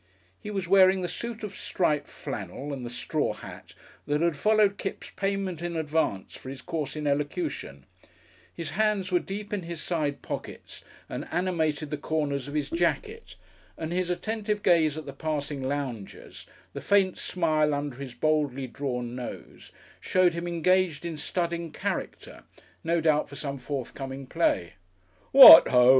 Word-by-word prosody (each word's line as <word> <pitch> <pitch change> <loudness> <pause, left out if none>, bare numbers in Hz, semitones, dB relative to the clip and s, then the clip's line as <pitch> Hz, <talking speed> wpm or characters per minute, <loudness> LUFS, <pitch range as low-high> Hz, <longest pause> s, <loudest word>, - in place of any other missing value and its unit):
He - - -7
was 195 -3 -3
wearing 190 0 +5
the 180 - -1
suit 235 +4 -6
of 200 -2 -6
striped 150 -5 0
flannel 115 +8 -6
and 130 -2 -6
the 120 - -5
straw 120 - -2
hat - - -11 0.3
that 145 0 +1
had 170 -1 +1
followed 210 +3 +3
Kipps' - - -5
payment 195 -4 -2
in 175 -1 -3
advance 155 -11 -1
for 130 - -10
his 135 0 -8
course 155 -5 -4
in 150 -1 -4
elocution, 145 - -2 0.7
his 165 -3 -6
hands 205 0 0
were 180 - +4
deep 205 +3 -6
in 205 - -1
his 170 -1 -6
side 155 -5 -2
pockets - - -7 0.2
and - - -6
animated 160 -5 -1
the 150 - -3
corners 145 -4 -2
of 145 - -7
his 145 -1 -2
jacket, 430 - -1 0.4
and 160 +1 -4
his 180 0 -1
attentive 210 +2 -2
gaze 160 -4 +3
at 155 - -6
the 140 - -7
passing 150 -2 -3
loungers, 130 -6 -5 0.3
the - - -6
faint 195 -2 +2
smile 155 -4 +1
under 145 -3 -3
his 135 -3 -8
boldly 150 -4 0
drawn 125 -2 -4
nose, 125 -1 -8 0.3
showed 185 -2 +2
him 170 +1 -4
engaged 175 -1 +1
in 170 -2 -3
studying 170 +2 -2
character - - -5 0.4
no 170 0 +1
doubt 155 -2 +2
for 140 - -10
some 140 -1 -5
forthcoming 135 0 -5
play. 125 - 0 0.6
"What 260 -11 +12
HO!" 125 -1 +5
160 Hz, 160 wpm, -27 LUFS, 140-185 Hz, 0.7 s, What